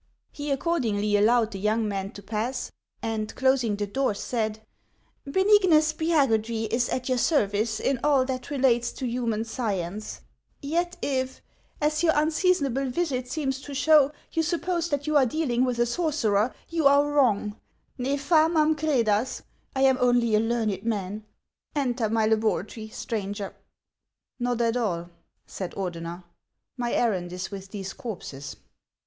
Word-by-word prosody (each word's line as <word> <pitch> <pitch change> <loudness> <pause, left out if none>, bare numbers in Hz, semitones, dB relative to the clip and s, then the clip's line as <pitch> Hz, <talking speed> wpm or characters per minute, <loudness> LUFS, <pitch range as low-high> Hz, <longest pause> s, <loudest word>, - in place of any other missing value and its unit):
He 290 0 -5
accordingly 245 - 0
allowed 225 +2 +3
the 195 - -6
young 215 +2 +1
man 195 -1 -3
to 205 - -10
pass, 220 +5 -3 0.3
and 220 -1 -3
closing 260 -5 +2
the 205 0 -2
door, 260 +1 0
said: 220 0 -2 0.4
" - - -41
Benignus 370 -5 +4
Spiagudry 235 -9 +1
is 240 0 +1
at 255 -1 -2
your 255 -1 +1
service 220 -6 +1
in 270 -2 0
all 280 -3 +4
that 255 -1 -4
relates 255 -4 +2
to 260 - -5
human 235 -3 -1
science; 210 -4 -3 0.4
yet 345 +4 -1
if, 260 -1 -1 0.4
as 305 +1 +1
your 325 -2 +4
unseasonable 300 -4 +1
visit 255 -4 -2
seems 270 -2 -2
to 285 0 -8
show, 290 0 +5 0.2
you 325 - +1
suppose 340 +1 -1
that 285 -1 -1
you 305 0 0
are 270 - +5
dealing 255 -3 0
with 250 -2 -1
a 240 - +3
sorcerer, 240 - +1 0.2
you 325 -4 +3
are 285 +1 +5
wrong; 225 -8 +1 0.4
ne 260 +3 0
f 285 +4 -8
amain 315 -1 +5
crcdas; 255 -6 +1 0.3
I 265 - 0
am 265 -1 +4
only 245 -2 +3
a 210 - +5
learned 220 -4 -1
man. 210 -1 -3 0.5
Enter 245 -5 0
my 220 0 +2
laboratory, 220 0 0
stranger." 205 -3 -4 0.5
" - - -28
Xot 245 -1 0
at 230 0 +1
all," 175 -7 -2 0.3
said 185 -3 -6
Ordener; 175 -2 -5 0.3
" - - -55
my 240 -2 -2
errand 185 -7 0
is 180 +2 -5
with 195 -1 -7
these 195 -2 -6
corpses." 140 - -7
245 Hz, 155 wpm, -26 LUFS, 215-285 Hz, 0.5 s, show